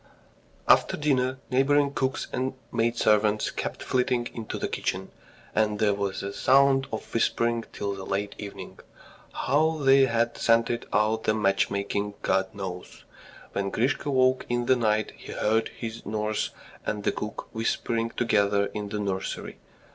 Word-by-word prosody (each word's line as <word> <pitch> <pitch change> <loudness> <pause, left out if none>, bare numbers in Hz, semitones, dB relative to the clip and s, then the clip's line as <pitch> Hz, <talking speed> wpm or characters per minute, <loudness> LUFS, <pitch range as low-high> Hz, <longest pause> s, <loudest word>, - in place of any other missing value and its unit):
After - - +5
dinner, 130 -3 +1
neighbouring 140 +2 +3
cooks 130 -1 -1
and 130 +1 -1 0.2
maidservants 110 -2 +2
kept - - -4
flitting 125 -1 0
into 115 -2 -5
the - - -2
kitchen, 95 +1 -3 0.4
and 105 -1 +1
there 105 -1 +3
was 100 -1 -2
the 100 0 -4
sound 135 +2 +4
of 110 - -6
whispering 115 0 +1
till 100 -1 -3
late 100 +1 -3
evening. 100 -1 -8 0.5
How 155 +4 +1
they 135 -2 +5
had 115 0 0
scented 115 +1 +2
out 110 +2 +1
the 110 - +2
matchmaking, 100 0 0
God 95 0 +2
knows. 90 -2 -7 0.5
When 100 0 -1
Grisha 130 +7 0
woke 130 -1 +3
in 120 0 0
the 130 - +4
night 110 -3 +1
he - - -9
heard 110 +1 +1
his 115 -1 -7
nurse 105 0 -1 0.3
and 105 -1 -3
the - - +2
cook 105 - -6
whispering 115 0 -1
together 100 -4 +1
in 105 -1 -4
the 105 - -3
nursery. 95 -2 -3
110 Hz, 145 wpm, -27 LUFS, 105-130 Hz, 0.5 s, After